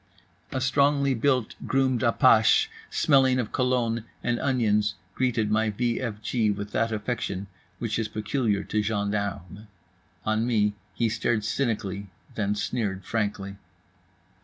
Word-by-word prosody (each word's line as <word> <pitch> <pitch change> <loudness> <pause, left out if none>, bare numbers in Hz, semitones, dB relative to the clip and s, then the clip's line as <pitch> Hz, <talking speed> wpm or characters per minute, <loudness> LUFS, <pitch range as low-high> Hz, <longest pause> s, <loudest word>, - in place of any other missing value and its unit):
A 130 - -1
strongly 140 +1 +3
built, 125 -1 +1
groomed 130 -2 +2
apache 115 -2 +5 0.2
smelling 130 -3 +4
of 120 -4 -2
cologne 125 -3 0 0.2
and 120 -1 0
onions 105 -6 +1 0.2
greeted 115 -4 0
my 110 +1 +2
v 120 +3 -1
f 115 -5 -4
g 110 -2 +1
with 100 0 -3
that 115 +2 0
affection 105 -3 -3 0.3
which 115 -2 -2
is 110 - -1
peculiar 105 0 -1
to 105 - -1
gendarmes. 100 -2 -3 0.6
On 110 +2 +1
me 105 -4 +2 0.2
he 115 - +1
stared 110 0 0
cynically, 105 -5 -2 0.3
then 105 -1 -1
sneered 100 -2 -2
frankly. 100 -3 -2
110 Hz, 130 wpm, -26 LUFS, 105-125 Hz, 0.6 s, apache